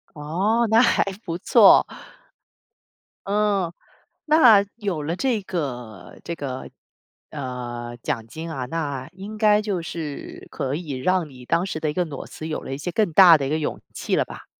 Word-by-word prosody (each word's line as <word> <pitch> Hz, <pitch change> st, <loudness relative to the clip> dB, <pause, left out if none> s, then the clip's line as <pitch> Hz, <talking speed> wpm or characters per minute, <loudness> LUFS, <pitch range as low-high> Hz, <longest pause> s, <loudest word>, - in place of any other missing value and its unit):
哦， 190 Hz, +11 st, 0 dB
那 225 Hz, +1 st, +6 dB
还 -, -, +3 dB, 0.2 s
不 165 Hz, 0 st, -4 dB
错。 -, -, +6 dB, 1.4 s
嗯， 200 Hz, -4 st, +1 dB, 0.5 s
那 250 Hz, -10 st, +6 dB
有 190 Hz, -9 st, -3 dB
了 165 Hz, +4 st, -2 dB
这 250 Hz, -6 st, 0 dB
个， 125 Hz, -, -6 dB
这 170 Hz, -, -4 dB
个， 130 Hz, -4 st, -6 dB, 0.6 s
呃， 120 Hz, -4 st, -6 dB
奖 115 Hz, -2 st, -3 dB
金 160 Hz, +7 st, -7 dB
啊， 130 Hz, -5 st, -4 dB
那 145 Hz, -4 st, -4 dB
应 200 Hz, +3 st, -9 dB
该 210 Hz, -1 st, +4 dB
就 200 Hz, -5 st, -2 dB
是 160 Hz, -3 st, -7 dB
可 135 Hz, 0 st, -3 dB
以 160 Hz, -2 st, -6 dB
让 165 Hz, +5 st, 0 dB
你 125 Hz, -2 st, -13 dB
当 170 Hz, +6 st, +1 dB
时 160 Hz, -4 st, -4 dB
的 155 Hz, -, 0 dB
一 -, -, -3 dB
个 180 Hz, +1 st, 0 dB
裸 145 Hz, -4 st, -7 dB
辞 155 Hz, -, -8 dB
有 155 Hz, -, -3 dB
了 135 Hz, -, -6 dB
一 -, -, -4 dB
些 175 Hz, +5 st, -4 dB
更 215 Hz, -6 st, +1 dB
大 170 Hz, -2 st, +8 dB
的 140 Hz, -, -3 dB
一 -, -, -2 dB
个 155 Hz, +1 st, 0 dB
勇 150 Hz, -, -3 dB
气 -, -, -2 dB
了 -, -, +2 dB
吧。 -, -, -11 dB
165 Hz, 190 characters per minute, -23 LUFS, 140-195 Hz, 1.4 s, 大